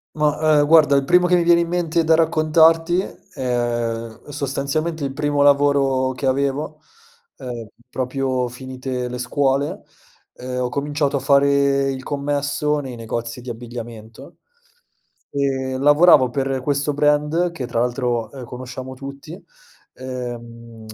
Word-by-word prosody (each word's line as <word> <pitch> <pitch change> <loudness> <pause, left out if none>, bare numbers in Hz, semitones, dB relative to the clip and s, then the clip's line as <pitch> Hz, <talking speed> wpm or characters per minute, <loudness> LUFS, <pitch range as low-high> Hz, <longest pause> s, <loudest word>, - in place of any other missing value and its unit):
Ma, 150 0 +2
ehm, 145 - +2
guarda 155 -3 +6
il 140 - +2
primo 180 +4 +4
che 180 0 +3
mi 175 - +3
viene 170 0 +4
in 170 - -1
mente 170 -1 0
da 160 - +3
raccontarti 165 +1 +3 0.3
è 120 -2 -2
sostanzialmente 145 +3 -2
il 135 - -2
primo 145 +1 -1
lavoro 140 -2 +3
che 130 +1 -3
avevo, 140 +3 -1 0.6
ehm, 120 -3 -7 0.2
proprio 130 0 -1
finite 130 0 -5
le 125 - -5
scuole, 135 +2 0 0.5
ehm, 125 0 -5
ho 125 - -1
cominciato 145 +1 -1
a - - -2
fare 140 0 +3
il 130 -1 -6
commesso 145 +1 -1
nei 130 -4 -6
negozi 115 +1 -5
di 125 - -8
abbigliamento. 115 -1 -9 1.0
E 135 -2 -1
lavoravo 145 -1 +6
per 135 +1 -2
questo 145 +2 -1
brand, 150 +4 +2
che 135 -7 -5
tra 115 -2 -2
l'altro, 120 -2 -1
ehm, 130 -3 -8
conosciamo 130 +1 -8
tutti, 140 +6 -10 0.5
ehm, 120 -3 -8
135 Hz, 135 wpm, -21 LUFS, 125-150 Hz, 1.0 s, guarda